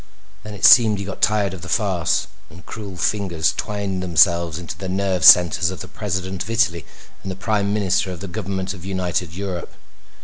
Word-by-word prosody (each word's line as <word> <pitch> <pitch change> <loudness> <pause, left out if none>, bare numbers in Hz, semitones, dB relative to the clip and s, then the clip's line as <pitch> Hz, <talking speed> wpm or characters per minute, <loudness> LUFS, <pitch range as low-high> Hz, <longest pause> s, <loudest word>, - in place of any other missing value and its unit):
Then 105 +1 -9
it 95 - +1
seemed 110 -4 +7
he 100 - -5
got 100 - -8
tired 105 -3 +1
of 95 - -9
the - - -9
farce, - - 0 0.2
and 85 +3 -15
cruel 100 -4 -8
fingers 90 -6 0
twined 100 -3 -4
themselves 85 -2 +2
into 85 -1 -7
the 95 - -7
nerve 95 -2 -1
centers 85 -1 +6
of 95 - -7
the - - -8
President 95 -2 -4
of 95 - -5
Italy 105 -9 0 0.3
and 95 - -6
the - - -6
Prime 100 +1 -1
Minister 95 -2 0
of 90 - -8
the 100 - -7
government 95 -1 -4
of 90 -3 -12
United 90 -3 -3
Europe. 95 0 -6
95 Hz, 195 wpm, -20 LUFS, 90-100 Hz, 0.3 s, seemed